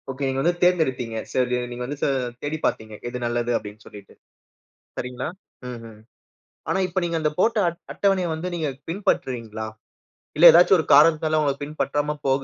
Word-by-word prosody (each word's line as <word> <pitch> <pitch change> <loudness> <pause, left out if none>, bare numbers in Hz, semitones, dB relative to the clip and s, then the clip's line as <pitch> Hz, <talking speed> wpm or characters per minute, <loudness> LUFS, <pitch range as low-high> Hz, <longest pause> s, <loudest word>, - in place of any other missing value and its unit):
Okay. 135 +1 -3
நீங்க 135 0 -1
வந்து 175 +5 +2
தேர்ந்தெடுத்தீங்க. 130 -10 +1 0.2
சரி 125 -1 +1
நீங்க 120 0 -5
வந்து, 145 +3 -5
ச - - +4 0.4
தேடிப்பாத்தீங்க. 145 -7 -2
எது 125 +1 -4
நல்லது 120 0 -1
அப்டின்னு 105 0 -10
சொல்லிட்டு, 100 -2 -13 0.8
சரிங்களா? 125 0 -4 0.4
ம்ஹம். 115 -3 -10 0.7
ஆனா 190 - +1
இப்ப 185 +1 -1
நீங்க 170 -1 -2
அந்த 155 -1 +1
போட்ட 225 +4 +2
அட்ட 170 0 -3
அட்டவணைய 195 -2 +1
வந்து 160 +3 -4
நீங்கப் 145 -5 -3
பின்பற்றுறீங்களா? 120 - -2 0.7
இல்ல 165 - +6
எதாச்சு 175 +3 +6
ஒரு 160 - -1
காரணத்தால 155 +1 +5
உங்க 140 -2 +1
பின்பற்றாம 150 0 -2
போக 135 0 +1
140 Hz, 155 wpm, -23 LUFS, 120-165 Hz, 0.8 s, இல்ல